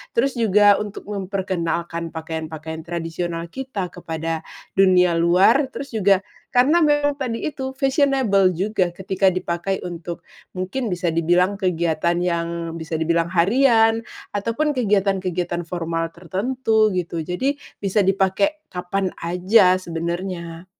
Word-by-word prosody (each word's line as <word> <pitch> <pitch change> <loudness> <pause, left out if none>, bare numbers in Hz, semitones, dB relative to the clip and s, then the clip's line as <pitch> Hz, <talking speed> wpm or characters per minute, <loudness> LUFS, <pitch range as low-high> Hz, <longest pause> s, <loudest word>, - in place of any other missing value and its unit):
terus 250 +1 +1
juga 205 -2 +5
untuk 210 -1 -6
memperkenalkan 180 -4 -3
pakaian-pakaian 160 0 -5
tradisional 170 0 -3
kita 255 -9 -4
kepada 165 -1 -4 0.3
dunia 185 -2 +4
luar, 185 - +4
terus 275 +1 -8
juga 200 -3 +3 0.3
karena 280 +8 +4
memang 290 -1 +3
tadi 245 0 -3
itu, 265 -3 -4
fashionable 265 -9 +3
juga 190 -1 0
ketika 190 +2 +1
dipakai 185 +1 -2
untuk 170 -1 -6 0.3
mungkin 210 +7 -2
bisa 175 -3 -1
dibilang 175 +4 +2
kegiatan 170 -1 +1
yang 170 -1 0 0.3
bisa 160 -1 -4
dibilang 165 +1 +1
harian 225 +5 +4 0.3
ataupun 230 +9 0
kegiatan-kegiatan 190 - 0
formal 165 -1 -2
tertentu 220 +5 +1
gitu, 170 -2 -2
jadi 180 - -1 0.2
bisa 200 +1 0
dipake 195 +11 +1
kapan 185 +1 -2
aja 180 +3 +4
sebenarnya. 170 0 -5
185 Hz, 115 wpm, -22 LUFS, 170-220 Hz, 0.3 s, juga